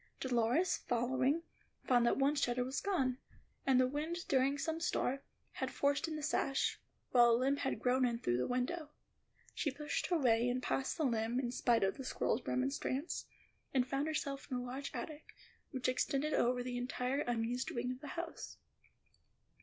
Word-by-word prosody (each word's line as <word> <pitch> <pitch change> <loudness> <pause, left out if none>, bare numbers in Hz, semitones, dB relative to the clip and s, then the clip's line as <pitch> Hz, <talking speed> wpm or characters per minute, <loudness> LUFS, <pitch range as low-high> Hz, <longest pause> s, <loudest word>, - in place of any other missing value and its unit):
Dolores, 250 +7 +2
following, 260 +6 +1 0.4
found 245 -2 +4
that - - +3
one 275 +2 +3
shutter 250 -4 +1
was 260 +2 -2
gone, 265 -11 0 0.5
and 260 -1 +5
that - - +6
the - - +3
wind, 315 +6 -3
during 270 +1 +3
some 320 +2 -2
storm, 275 -5 0 0.3
had - - -3
forced 285 +3 +1
in 315 - -3
the 305 - -5
sash, 275 -2 +1 0.3
while 240 -1 +7
a 230 - +5
limb 270 +3 +2
had 270 -2 -1
grown 255 +1 +2
in 240 -2 +2
through 120 - 0
the 125 - 0
window. 290 +6 -1 0.6
She 305 - 0
pushed 295 +2 -2
her 350 - +2
way 240 -4 +3
in 250 +1 0
past 265 +3 -1
the 315 - +1
limb, 230 0 +1
in 245 -2 -1
spite 240 -2 +2
of 195 0 +1
the 270 - -5
squirrel's - - 0
remonstrance, 270 +3 -1 0.5
and 255 -2 +4
found 275 +3 0
herself 280 -3 -2
in 255 - -1
a 245 - -3
large 260 +3 -4
attic, 305 -1 -7 0.3
which 255 -1 -2
extended 275 +4 +1
over 245 +1 +2
the 245 0 -3
entire 250 +2 -1
unused 240 -1 -1
wing 245 +1 -2
of 255 +1 -7
the 295 - -7
house. 335 0 -5
260 Hz, 185 wpm, -35 LUFS, 245-285 Hz, 0.6 s, while